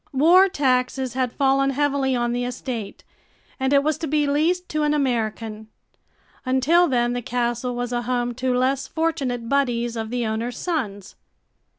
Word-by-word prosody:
War 350 +8 +6
taxes 260 -4 0
had 255 -2 -1
fallen 275 0 +2
heavily 275 -1 0
on 240 -1 0
the 245 0 -1
estate 245 -4 -5 0.6
and 265 0 0
it 280 0 +4
was 305 -1 0
to 325 - -3
be 300 0 +1
leased 330 +6 +1
to 305 - -1
an 300 0 +2
American. 225 -5 -2 0.8
Until 280 +7 +3
then, 240 -3 +1
the 245 - -2
castle 240 +1 -2
was 245 0 -3
a 240 - 0
home 245 0 -1
to 255 +1 -1
less 265 +1 0
fortunate 275 -8 -2
buddies 240 -3 0
of 220 -1 -4
the 245 0 -2
owner's 225 +3 -3
sons. 215 - -3
255 Hz, 165 wpm, -23 LUFS, 240-285 Hz, 0.8 s, War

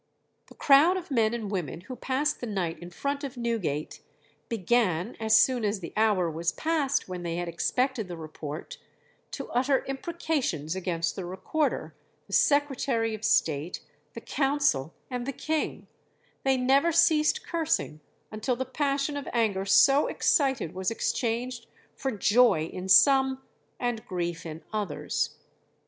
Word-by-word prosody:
"The - - -16
crowd 300 +7 +5
of 360 -4 -7
men 225 -4 +3
and 225 -4 -4
women 175 -5 -3
who 255 +8 -8
passed 280 +4 -1
the 245 - -4
night 185 -6 -2
in 175 - -9
front 280 - -3
of 270 -2 -6
Newgate, 215 -11 -2 0.5
began, 220 -3 +1
as 220 0 +4
soon 255 -3 +3
as 205 -1 0
the 170 - -8
hour 210 -5 +3
was 165 +2 -1
passed 305 - 0
when 180 -1 -5
they 170 -1 -3
had 175 0 -3
expected 245 +6 -1
the 175 -2 -7
report, 155 -1 -7 0.5
to - - -7
utter 260 +2 +1
imprecations 270 - -2
against 170 -3 -2
the 190 - -5
Recorder, 190 - -2 0.3
the - - -12
Secretary 270 -6 +2
of 215 0 -7
State, 155 -3 +1 0.3
the 230 - -6
Council, 270 - +1 0.2
and 250 0 -3
the - - 0
King; 310 +4 -2 0.6
they 270 -1 +2
never 270 +6 +3
ceased 310 -2 +3
cursing 325 - -1 0.3
until 215 +4 -1
the 260 +2 -3
passion 280 +2 -1
of 285 -1 -5
anger 210 -5 +1
so 275 +8 +5
excited 270 - +1
was 185 0 -1
exchanged 235 +2 -2 0.3
for 270 - -3
joy 215 -6 +3
in 185 +1 -6
some 265 +4 +5 0.4
and 240 -3 -2
grief 175 -2 -3
in 160 0 -8
others. 205 -8 -2
230 Hz, 150 wpm, -27 LUFS, 180-275 Hz, 0.6 s, crowd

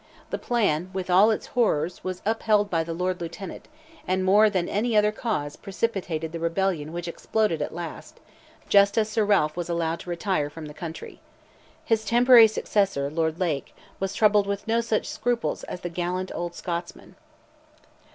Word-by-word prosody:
The - - -2
plan, 185 -8 0
with 185 -1 -3
all 195 +5 +6
its 220 - -1
horrors, 180 -8 +1
was 185 -1 -5
upheld 210 -1 +2
by 165 -2 +1
the 165 - -6
Lord 180 +1 -2
Lieutenant, 175 +3 -7 0.4
and 185 0 0
more 210 +3 +6
than 185 -4 -1
any 220 +2 0
other 210 0 +4
cause, 180 -11 -3
precipitated 190 -6 -3
the 165 - -5
rebellion 165 -2 -1
which 175 +1 -5
exploded 210 +1 -1
at - - -2
last, 170 0 -8 0.5
just 200 +1 +4
as 215 -1 +2
Sir 220 0 +1
Ralph 195 -7 +2
was 175 -1 -4
allowed 170 -1 -1
to - - -10
retire 170 -4 -1
from 155 +1 -9
the 150 - -9
country. 165 +1 -8 0.6
His 225 -1 +1
temporary 235 +1 +7
successor, 195 -9 0
Lord 160 0 -1
Lake, 160 -7 -2 0.2
was 195 0 -3
troubled 210 -2 +4
with 200 +1 -3
no 230 +1 +2
such 225 -2 -1
scruples 240 0 -2
as 180 - -7
the - - -3
gallant 180 +2 -3
old 175 0 -4
Scotsman. 170 -1 -6
185 Hz, 170 wpm, -25 LUFS, 170-210 Hz, 0.6 s, temporary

